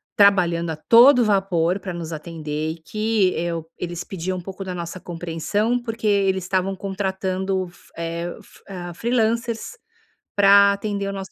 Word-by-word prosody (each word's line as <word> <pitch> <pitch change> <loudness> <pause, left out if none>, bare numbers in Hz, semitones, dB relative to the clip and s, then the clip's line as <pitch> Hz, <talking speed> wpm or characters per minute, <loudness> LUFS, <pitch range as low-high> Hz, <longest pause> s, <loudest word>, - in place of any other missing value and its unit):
trabalhando 175 -5 +4
a 160 - -2
todo 240 - +6
vapor 190 -3 +1
para 185 -1 -6
nos 170 -1 -5
atender, 155 -1 -4
e - - -6
que 215 +3 +1
eu 165 -1 -3
eles 175 0 -4
pediam 185 0 -4
um - - -5
pouco 195 +2 -7
da 185 -1 -5
nossa 170 +1 -6
compreensão, 175 +8 -2
porque 225 -2 -6
eles 195 -2 +2
estavam 185 +1 -1
contratando 190 -1 -2
f 175 - -21
eh, 170 +1 -4
f - - -19
ah, 175 -2 -6
freelancers 230 - -1 0.6
para 200 0 +7
atender 200 0 -3
o 195 - -3
nosso 195 -1 -6
190 Hz, 160 wpm, -22 LUFS, 170-200 Hz, 0.6 s, para